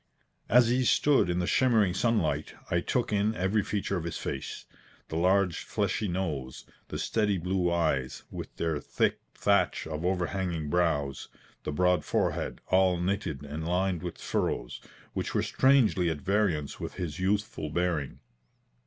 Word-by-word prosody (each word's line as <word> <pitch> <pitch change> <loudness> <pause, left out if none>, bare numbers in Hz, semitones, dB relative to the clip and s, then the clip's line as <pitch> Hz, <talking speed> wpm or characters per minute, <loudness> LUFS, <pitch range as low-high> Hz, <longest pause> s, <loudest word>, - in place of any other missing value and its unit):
As 120 -1 +6
he 125 +2 +2
stood 135 -4 +3
in 90 - 0
the 90 - 0
shimmering 110 -5 +3
sunlight, 105 -4 0 0.2
I 85 - +3
took 120 +3 -1
in 105 +2 +1
every 95 +3 +1
feature 100 -1 -2
of 85 - -4
his 85 - -4
face. 70 - -5 0.4
The - - -4
large, 90 +1 +2
fleshy 105 - -1
nose; 80 -9 -3 0.2
the - - -5
steady 105 -3 +1
blue 90 0 0
eyes, 80 -7 0
with - - -7
their 80 -3 -1
thick - - 0 0.2
thatch - - +2
of 80 0 -4
overhanging 90 -3 -1
brows; 80 -6 0 0.4
the - - -1
broad 90 +4 +2
forehead, - - -1
all 95 -1 +4
knitted 90 -6 -2
and 75 +2 -5
lined 90 +1 0
with 90 -1 -5
furrows, - - -2 0.3
which - - -3
were - - +2
strangely 120 -10 +3
at 75 -3 -3
variance 95 -7 0
with - - -5
his 85 -4 -4
youthful 100 -4 -1
bearing. 85 -3 -1
90 Hz, 155 wpm, -29 LUFS, 80-100 Hz, 0.4 s, As